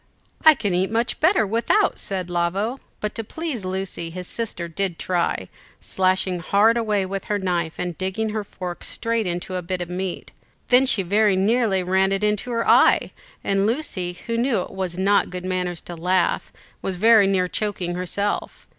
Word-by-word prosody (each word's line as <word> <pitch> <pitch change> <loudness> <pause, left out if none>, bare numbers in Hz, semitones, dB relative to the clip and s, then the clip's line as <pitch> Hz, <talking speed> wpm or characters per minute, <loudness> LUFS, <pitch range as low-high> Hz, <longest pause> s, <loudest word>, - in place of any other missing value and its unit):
"I 315 -1 +8
can 205 -7 -1
eat 185 +2 +1
much 230 +1 -1
better 320 - +4
without," 225 +4 +1
said 185 -3 -3
Lavo, 185 +8 -1 0.2
but 210 0 -2
to 225 - -4
please 300 - -4
Lucy 185 -2 -4
his 180 +2 -7
sister 205 -5 -4
did 175 +1 -2
try; 175 -2 -1 0.3
slashing 185 -1 0
hard 205 +6 +3
away 210 -4 +1
with 195 0 -4
her 210 - 0
knife, 175 -4 -1
and 175 -1 -3
digging 190 +5 -2
her 215 0 -2
fork 180 -3 -7
straight 230 -3 -1
into 175 +1 -4
a 180 - -2
bit 180 +1 -3
of 175 0 -5
meat. 185 0 -4 0.4
Then 255 +2 +5
she 205 -6 +2
very 205 +2 +3
nearly 200 -1 +2
ran 190 +2 +2
it 195 +1 -1
into 210 +3 0
her 230 -1 -1
eye, - - +5 0.3
and 195 +1 +1
Lucy, 190 - -2
who 230 0 -1
knew 240 -5 +1
it - - -7
was 185 -2 -4
not 200 +2 +3
good 180 0 -6
manners 180 -2 -2
to 175 - -8
laugh, 180 +2 0 0.3
was 190 - -2
very 215 +1 +6
near 185 -2 +2
choking 185 -3 -2
herself. 185 +3 -3
190 Hz, 180 wpm, -23 LUFS, 180-220 Hz, 0.4 s, I